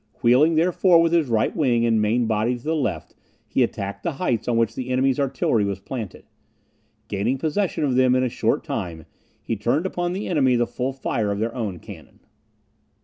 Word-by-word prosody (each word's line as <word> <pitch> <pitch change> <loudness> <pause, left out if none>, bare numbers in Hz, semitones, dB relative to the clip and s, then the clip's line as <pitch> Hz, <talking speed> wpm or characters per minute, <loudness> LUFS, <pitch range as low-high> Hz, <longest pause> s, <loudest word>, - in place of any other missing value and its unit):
Wheeling, 135 +7 +5
therefore, 175 +1 +4
with 165 0 +2
his 165 -4 +3
right 115 -2 0
wing 120 -6 +2
and 115 -2 +2
main 115 +3 +1
body 110 +3 0
to 120 - -16
the 160 +1 -1
left, 150 - -3 0.3
he - - 0
attacked 100 0 -2
the 170 - -2
heights 130 - -2
on 120 -2 +1
which 115 -1 +1
the 130 +1 -5
enemy's 130 +1 +1
artillery 130 -5 +1
was 100 -1 -2
planted. 110 0 -7 0.8
Gaining 105 +7 -1
possession 165 +5 -1
of 140 -3 +1
them 130 0 +4
in 130 - +2
a - - +1
short 120 - -1
time, 80 -3 -5 0.4
he 115 - -2
turned 120 - 0
upon 175 -1 -2
the 195 +3 -4
enemy 135 -7 +2
the 120 0 +2
full 125 +3 -3
fire 115 -5 -2
of 100 - -2
their 115 +2 -2
own 105 -8 -4
cannon. - - -13
125 Hz, 200 wpm, -23 LUFS, 110-150 Hz, 0.8 s, Wheeling